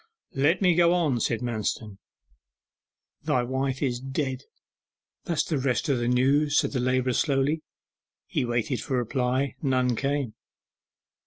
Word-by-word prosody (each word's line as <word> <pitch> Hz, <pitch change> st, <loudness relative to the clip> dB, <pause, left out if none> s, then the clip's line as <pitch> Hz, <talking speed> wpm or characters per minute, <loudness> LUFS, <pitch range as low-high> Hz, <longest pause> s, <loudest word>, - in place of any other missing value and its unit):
'Let 155 Hz, +8 st, +2 dB
me 180 Hz, -2 st, +5 dB
go 170 Hz, +1 st, +4 dB
on,' 150 Hz, -9 st, +1 dB
said 115 Hz, 0 st, 0 dB
Manston. 110 Hz, -3 st, -3 dB, 1.2 s
'Thy 125 Hz, -, +1 dB
wife 130 Hz, +2 st, -2 dB
is 125 Hz, -3 st, 0 dB
dead; 135 Hz, 0 st, -3 dB, 0.8 s
that's 165 Hz, -4 st, 0 dB
the 150 Hz, -, -1 dB
rest 130 Hz, +2 st, 0 dB
o' -, -, +3 dB
the 120 Hz, -1 st, -1 dB
news,' 140 Hz, +4 st, +3 dB
said -, -, +2 dB
the 130 Hz, -, -1 dB
labourer 130 Hz, 0 st, +1 dB
slowly. 140 Hz, +3 st, +1 dB, 0.6 s
He -, -, -1 dB
waited 120 Hz, +1 st, -1 dB
for 135 Hz, -, -2 dB
a -, -, +2 dB
reply; 125 Hz, +3 st, 0 dB
none 130 Hz, -3 st, +1 dB
came. 140 Hz, -3 st, -1 dB
130 Hz, 145 wpm, -26 LUFS, 125-145 Hz, 1.2 s, me